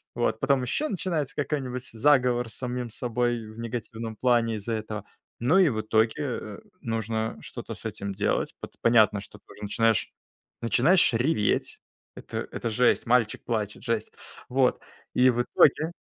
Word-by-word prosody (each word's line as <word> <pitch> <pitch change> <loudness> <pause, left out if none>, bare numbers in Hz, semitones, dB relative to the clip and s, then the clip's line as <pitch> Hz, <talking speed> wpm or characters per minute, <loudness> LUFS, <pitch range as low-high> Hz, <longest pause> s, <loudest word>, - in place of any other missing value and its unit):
Вот, 110 - 0
потом 135 +1 +2
еще 130 - -1
начинается 170 - -2
какой-нибудь 130 -3 -3
заговор 125 -1 +3
с 110 - -6
самим 125 -1 -4
собой 120 0 -1
в 110 +1 -12
негативном 115 -1 -5
плане 120 -1 +2
из-за 110 +2 -3
этого. 110 -1 -4 0.4
Ну 135 +10 +4
и 190 -2 +6
в 110 -4 -1
итоге, 110 +1 +2
э, 135 - -4 0.2
нужно 110 - -2
что-то - - -7
с - - -14
этим 100 0 -4
делать. - - -1
Пот - - -9
понятно, 110 -3 +5
что 100 - -12
ты - - -51
уже 105 - -11
начинаешь 115 +1 +1 0.5
начинаешь 135 +8 +4
реветь. 115 -2 0 0.3
Это - - -5
это 115 - -3
жесть, 125 +2 +2
мальчик 115 -2 +2
плачет, 105 -3 -3
жесть. 115 -3 -2 0.4
Вот. 130 0 +2 0.3
И 130 +1 +5
в 120 -1 +2
итоге 155 +5 +3
120 Hz, 155 wpm, -27 LUFS, 110-130 Hz, 0.5 s, и